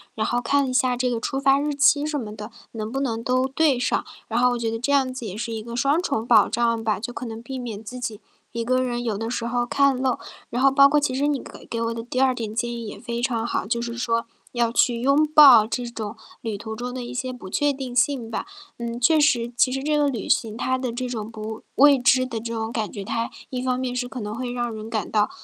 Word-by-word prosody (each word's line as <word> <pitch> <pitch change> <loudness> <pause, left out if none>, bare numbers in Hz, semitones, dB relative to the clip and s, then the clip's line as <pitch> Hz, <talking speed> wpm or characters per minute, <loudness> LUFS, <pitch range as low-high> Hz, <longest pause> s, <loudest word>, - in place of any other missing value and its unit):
然 220 - -1
后 240 +1 0
看 280 +3 +2
一 - - -3
下 255 -1 +2
这 250 0 +1
个 235 - -1
出 270 +4 -2
发 275 0 +4
日 295 0 -1
期 285 0 +4
什 305 -1 -1
么 215 -4 -6
的， 210 0 -7 0.2
能 215 -1 -5
不 270 - -2
能 230 -4 -1
都 255 +1 +1
对 280 -1 +2
上。 245 - 0 0.2
然 230 +1 0
后 250 0 +4
我 245 - -1
觉 230 -1 -2
得 225 - -3
这 255 +4 -1
样 265 -2 +2
子 255 -2 -6
也 195 -3 -5
是 230 +2 -4
一 220 -1 -4
个 235 +2 -7
双 275 +7 +2
重 255 -10 -1
保 230 -3 +6
障 230 -1 +1
吧， 215 -3 +1
就 245 +4 -5
可 250 - -6
能 225 0 -7
避 265 +2 -6
免 225 -4 -6
自 250 +3 -7
己 225 -3 -5 0.3
一 230 0 -2
个 255 +2 +1
人 240 -1 -2
有 220 -4 -1
的 225 +2 -3
时 235 -1 -2
候 240 0 0
看 275 +1 +2
漏。 260 -2 +1 0.3
然 245 - -2
后 275 - +6
包 275 0 +7
括 295 +2 +2
其 285 -3 0
实 280 +3 +1
你 290 -3 0
给 - - -12
给 230 - -4
我 230 0 -1
的 230 - -5
第 250 +2 -2
二 265 -1 +4
点 220 -3 -5
建 240 +1 -1
议 235 -1 -5
也 - - -7
非 235 0 -4
常 235 -3 0
好， - - -1
就 235 +1 0
是 235 0 -4
说， 230 -1 0 0.3
要 235 -2 +1
去 235 0 +2
拥 280 +4 +3
抱 255 -8 +9
这 245 +2 -3
种 225 -2 -6 0.2
旅 220 -3 -4
途 220 +2 -6
中 245 +1 -4
的 255 -1 -5
一 240 +1 -7
些 255 +1 -3
不 245 -6 -10
确 290 +8 +1
定 265 -2 -6
性 250 -2 +1
吧。 - - -3 0.3
嗯， 235 0 -4
确 310 +6 +4
实， 245 -6 +2
其 210 +4 +4
实 265 +1 -3
这 300 +1 +1
个 295 -1 +3
旅 245 -6 -3
行 220 -2 +1
它 260 +2 0
的 255 -2 -3
这 250 +1 -3
种 220 -3 -4
不 220 0 -7
未 280 0 +6
知 255 0 +4
的 235 -3 -4
这 230 +1 -5
种 225 0 -3
感 220 -3 -2
觉， 200 - -7
它 230 +3 -2 0.2
一 250 -1 -3
方 255 -1 0
面 255 -1 -2
是 250 0 -2
可 250 -1 -7
能 210 0 -4
会 245 +1 -4
让 240 -1 -2
人 215 0 -7
感 220 -2 -3
到， 210 -1 +2
240 Hz, 295 characters per minute, -23 LUFS, 230-260 Hz, 0.3 s, 抱